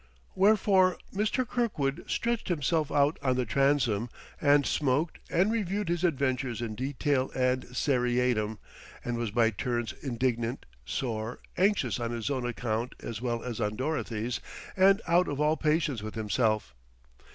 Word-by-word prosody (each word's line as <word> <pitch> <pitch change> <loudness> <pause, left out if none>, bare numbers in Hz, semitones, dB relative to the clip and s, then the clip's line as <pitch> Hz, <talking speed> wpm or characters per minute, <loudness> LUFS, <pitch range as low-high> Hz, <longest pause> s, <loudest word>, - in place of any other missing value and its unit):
Wherefore 190 -2 +4 0.2
Mr. 215 +5 0
Kirkwood 175 - -1
stretched 235 -1 -1
himself 155 -2 0
out 145 +2 +2
on 130 -2 +1
the 125 -1 0
transom 125 -3 +2 0.3
and 145 -1 +5
smoked 145 +3 0
and 190 +5 +2
reviewed 205 -3 -1
his 175 0 -1
adventures 130 -7 0
in 115 -2 -3
detail 130 +2 0
and 125 0 +1
seriatim, 125 -4 +1 0.5
and 120 - -1
was 115 -1 -2
by 115 +1 +3
turns 120 +2 -2
indignant, 120 -1 -1 0.2
sore, 115 - -3 0.2
anxious 185 - +2
on 120 -1 -2
his 120 +3 -3
own 130 -3 -1
account 120 0 -2
as 115 -1 -5
well 120 -2 -2
as 120 -2 -4
on 105 0 -1
Dorothy's, 125 -4 -2 0.4
and 195 +3 +5
out 175 +1 +4
of 145 -1 -3
all 150 +1 +3
patience 150 -6 0
with 110 +1 -6
himself. 110 - 0
130 Hz, 145 wpm, -29 LUFS, 120-160 Hz, 0.5 s, and